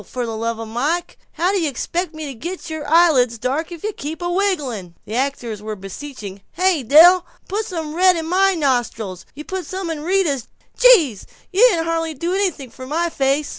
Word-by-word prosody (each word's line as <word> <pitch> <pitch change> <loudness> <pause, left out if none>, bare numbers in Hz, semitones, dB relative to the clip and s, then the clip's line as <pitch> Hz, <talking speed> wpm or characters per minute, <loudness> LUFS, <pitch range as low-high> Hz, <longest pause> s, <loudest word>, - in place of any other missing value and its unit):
For 245 +5 -4
the 225 -1 -4
love 230 +1 -3
o' 225 - -5
Mike, 290 +10 -2
how 355 +3 +1
do 395 - +1
you 315 - +1
expect 335 +5 -3
me 310 0 -6
to 280 - -6
get 340 +8 -7
your 305 -2 -5
eyelids 295 -8 +4
dark 270 +9 -2
if 340 -2 -9
you 430 0 -2
keep 310 0 -6
a 350 - -1
wigglin'?" 285 - -1
The 215 - -8
actors 245 -4 -2
were 215 0 -5
beseeching, 200 0 -8
"Hey, 365 -3 +2
Del, 330 +8 +7 0.2
put 420 +3 -2
some 320 -4 -5
red 365 +2 +4
in 325 - -3
my 380 +3 +3
nostrils 235 - -1
you 300 - -7
put 375 -1 -4
some 375 -3 -4
in 310 -2 -5
Rita's 330 -7 0 0.3
gee, 345 - +5 0.3
you 440 +7 +7
didn't 335 -6 0
hardly 330 -1 -1
do 335 +6 -2
anything 360 -10 -1
to 255 - -10
my 335 +4 -1
face." 275 +1 0
310 Hz, 205 wpm, -20 LUFS, 250-355 Hz, 0.3 s, Del